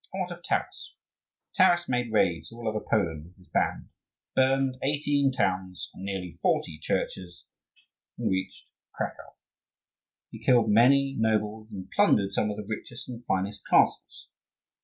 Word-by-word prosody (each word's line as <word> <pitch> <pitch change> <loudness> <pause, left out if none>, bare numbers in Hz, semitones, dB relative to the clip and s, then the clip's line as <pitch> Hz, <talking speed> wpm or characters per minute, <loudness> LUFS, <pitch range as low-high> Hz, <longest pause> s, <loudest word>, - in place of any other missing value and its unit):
And 190 - -3
what 180 -1 -3
of 175 0 -8
Taras? - - -3 0.6
Taras 175 -3 +4
made 125 -2 -1
raids 85 -5 +1
all 115 0 -7
over 110 0 0
Poland 80 -6 -1
with 90 +3 -17
his 90 - -20
band, - - -1 0.5
burned 130 0 +2
eighteen 145 -1 +1
towns 95 -7 -2
and 95 - -10
nearly 90 -4 -5
forty 75 -2 0
churches, 90 +2 -3 0.7
and - - -1
reached 95 0 -3 0.3
Cracow. - - -5 1.0
He - - -11
killed 120 -4 +4
many 135 +5 +5
nobles, 110 0 0
and 95 -3 -8
plundered 100 0 +3
some 105 - +1
of 105 - -4
the 105 - -6
richest 115 +2 -6
and 120 -1 -8
finest 95 +1 -2
castles. - - +2
110 Hz, 145 wpm, -27 LUFS, 95-130 Hz, 1.0 s, many